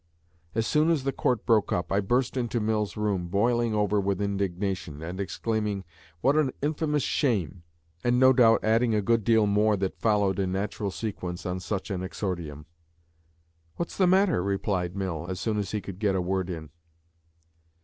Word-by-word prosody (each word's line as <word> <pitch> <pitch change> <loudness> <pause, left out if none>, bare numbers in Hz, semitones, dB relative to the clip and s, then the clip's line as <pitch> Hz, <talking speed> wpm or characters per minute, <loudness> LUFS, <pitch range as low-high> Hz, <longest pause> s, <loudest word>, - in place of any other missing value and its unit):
As 110 0 +1
soon 155 +5 +3
as 160 -5 +2
the 135 - 0
Court 125 -3 0
broke 110 -4 +3
up, 90 - -1
I 100 - +3
burst 120 +7 0
into 120 -2 -1
Mill's 105 -1 -1
room, 100 -4 -1
boiling 115 +4 +1
over 105 0 +2
with 100 -1 -1
indignation, 95 -5 -2
and 90 +3 -6
exclaiming, 105 0 -2 0.4
"What 140 +2 +3
an 150 -4 +2
infamous 150 -1 0
shame!" 95 - 0 0.4
and 120 0 +2
no 130 0 +7
doubt 115 -3 +5
adding 115 +1 +3
a 105 - +1
good 115 +1 +2
deal 110 0 +4
more 105 +1 +3
that 95 -1 -3
followed 105 -4 +2
in 95 -1 0
natural 100 +1 -2
sequence 90 -4 -5
on 90 0 -2
such 95 +2 -4
an 90 -2 -2
exordium. 85 -6 -4 1.1
"What's 170 - -4
the 185 - +3
matter?" 185 - +3
replied 95 -2 -1
Mill 90 -4 -3
as 95 -1 -4
soon 105 +1 -1
as 100 -2 -3
he 105 0 -2
could 95 -2 -8
get 100 -3 +1
a - - +1
word 95 0 -1
in. 80 -4 -6
105 Hz, 180 wpm, -27 LUFS, 95-115 Hz, 1.1 s, no